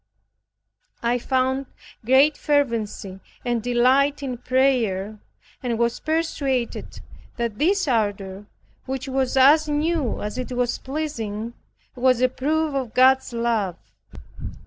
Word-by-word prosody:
I 240 +1 +1
found 260 +1 0 0.4
great 265 +6 +5
fervency 230 -9 -1 0.3
and 240 -2 0
delight 255 +5 +2
in 250 -3 -4
prayer, 225 -7 +1 0.4
and 240 -3 -2
was 235 0 0
persuaded 290 -6 -2 0.4
that 235 -3 -3
this 375 +3 +2
ardor, 205 -4 -1 0.4
which 265 +1 -4
was 265 0 0
as 300 +4 +6
new 300 -3 0
as 210 +4 -4
it 255 0 -4
was 245 -1 -1
pleasing, 235 -7 -4 0.4
was 255 -1 +3
a 255 0 +3
proof 305 +4 -1
of 260 -5 -3
God's 260 +1 +4
love. 230 -6 0
255 Hz, 115 wpm, -23 LUFS, 230-275 Hz, 0.4 s, as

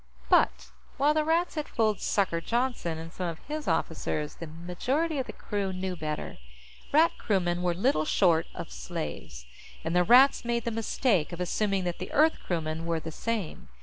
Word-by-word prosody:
But, - - +3 0.3
while 290 +3 +4
the 310 0 +2
Rats 330 +3 +1
had 305 -2 -3
fooled 215 -3 +1
"Sucker" 185 -5 +1
Johnston 235 -7 -1
and 165 +1 -8
some 180 - -3
of 165 -2 -4
his 300 +1 -4
officers, 160 -2 -1
the 165 - -8
majority 250 - -2
of 260 - -2
the - - -5
crew 200 -2 -3
knew 185 0 -3
better. 155 - -5 0.5
Rat 320 +3 +5
crewmen 175 -4 0
were 175 -1 +1
little 190 - +2
short 165 -1 +3
of - - -7
slaves, 60 -4 -6 0.4
and 165 +2 -2
the 180 - +5
Rats 250 +8 +6
made 235 -1 -1
the 235 - 0
mistake 220 - +1
of 175 - -6
assuming 195 +2 0
that 175 -1 -3
the 185 - -6
Earth 315 +2 +4
crewmen 165 -1 -2
were 165 -1 0
the 160 +1 -7
same. 215 -1 -4
185 Hz, 180 wpm, -28 LUFS, 165-245 Hz, 0.5 s, Rats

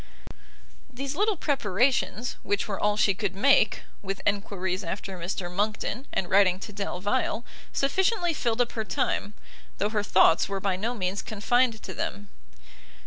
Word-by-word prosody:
These 270 +2 -4
little 420 +4 +2
preparations, 240 - +1
which 205 0 -1
were 200 -2 -3
all 210 0 +1
she 200 -2 +4
could 195 -2 -3
make, 220 0 +4 0.2
with 195 -1 -4
enquiries 200 -2 -1
after 190 +2 -4
Mr 175 0 -4
Monckton, 215 +6 -1
and 180 - -1
writing 190 -1 +4
to 210 - -7
Delvile, 200 +4 -1 0.3
sufficiently 350 +5 +1
filled 240 -4 0
up 240 - 0
her 220 - -2
time, 210 -1 -1 0.4
though 205 - 0
her 215 -1 0
thoughts 175 -3 +4
were 195 0 -2
by 195 -1 0
no 225 +6 -2
means 190 -1 -1
confined 225 +2 +1
to - - -6
them. 200 +1 -4
205 Hz, 150 wpm, -27 LUFS, 195-245 Hz, 0.4 s, she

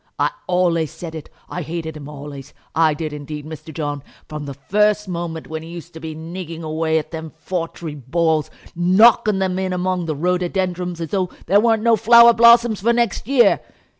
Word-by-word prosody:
I - - +1 0.2
ollays 175 -3 +1
said 165 -2 -8
it. 160 -2 -8 0.2
I 180 - -5
hated 160 0 -5
him 145 -2 -9
ollays; 145 -1 -9 0.2
I 160 -2 +3
did 155 0 -4
indeed, 150 0 -7
Mr. 160 0 -9
John, 145 -2 -4 0.3
from 150 -1 -6
the 140 - -6
first 210 +9 +1
moment 170 -2 -4
when 160 0 -6
he 165 - -10
used 170 0 -9
to 160 - -9
be 160 -1 -7
nigging 165 0 -7
away 160 0 0
at 155 - -4
them 160 -1 -6
foutry 165 -2 -5
balls, 155 +3 0 0.3
knocking 200 +4 +4
them 190 -1 -1
in 190 -1 -2
among 180 -1 -1
the 155 - -2
rhododendrons, 180 +1 -1
as 165 - -4
though 185 -3 -1 0.2
there 200 +4 +4
weren't 225 -1 +2
no 230 -1 +5
flower 235 +1 +7
blossoms 235 -2 +5
for 230 +4 +3
next 235 -3 0
year. 265 -2 +4
170 Hz, 190 wpm, -20 LUFS, 155-190 Hz, 0.3 s, flower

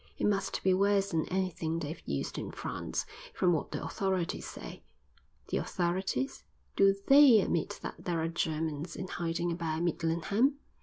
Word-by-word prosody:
It - - 0
must 195 -2 0
be 190 - +4
worse 200 +1 +2
than 160 -2 0
anything 180 -3 -1
they've 160 0 -5
used 70 -1 -2
in - - -5
France, - - -4 0.3
from 180 -1 +3
what 160 - -1
the - - -4
authorities 190 -2 -1
say." - - -8 0.7
"The - - 0
authorities? 175 - -1 0.3
Do 195 0 +5
they 275 -5 +8
admit 170 -4 -1
that - - -6
there 170 -2 0
are 160 - 0
Germans 160 0 -2
in 185 - -5
hiding 170 0 -2
about 165 -1 -2
Midlingham?" 175 - +1
175 Hz, 155 wpm, -31 LUFS, 165-195 Hz, 0.7 s, they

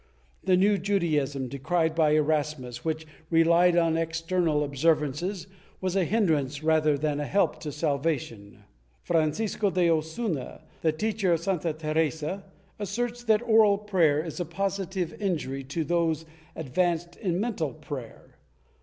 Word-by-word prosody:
The 185 -1 +3
new 200 +2 +3
Judaism, 150 -9 0
decried 160 +6 0
by 155 -2 +3
Erasmus, 150 -5 -1
which 160 0 -2 0.2
relied 170 +1 +4
on 165 -1 +3
external 165 -1 0
observances, 150 +5 0 0.3
was 185 0 -2
a 190 -2 +2
hindrance 155 - 0
rather 155 -2 +3
than 145 0 -1
a 145 - -2
help 200 - +1
to 150 - -5
salvation. 140 -9 -2 0.4
Francisco 175 +6 +1
de 180 -2 +2
Osuna, 160 - -2 0.2
the 160 - +3
teacher 200 +2 0
of 165 - +1
Santa 175 -3 -1
Teresa, 155 +3 -1 0.4
asserts 240 +4 -3
that 220 0 +3
oral 220 -3 +5
prayer 175 -7 +2
is 165 - -6
a - - 0
positive 190 0 -2
injury 150 -8 -2
to 150 +5 -2
those 165 0 0 0.3
advanced 170 +3 -1
in 180 -4 -1
mental 200 - -1
prayer. 145 -6 -9
165 Hz, 135 wpm, -27 LUFS, 150-185 Hz, 0.4 s, oral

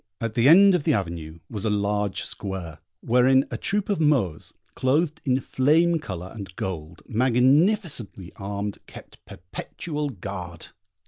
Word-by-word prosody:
At 115 -1 -3
the 120 +4 +4
end 195 +4 +8
of 175 -5 +1
the - - +2
avenue 85 -5 -4
was 105 -3 -6
a 110 - +1
large 105 -1 -1
square, 90 -6 -5 0.2
wherein 130 +3 +4
a - - -3
troop 200 0 -1
of 200 -4 0
Moors, 125 - +1 0.2
clothed 155 +5 0
in 130 -1 +2
flame 160 +6 +2
colour 95 - -7
and 100 -4 -9
gold, 80 -3 -6
magnificently 130 - +1
armed, 100 +1 -4
kept - - -14
perpetual 150 - -5
guard. 90 -6 -7
115 Hz, 140 wpm, -24 LUFS, 95-150 Hz, 0.2 s, end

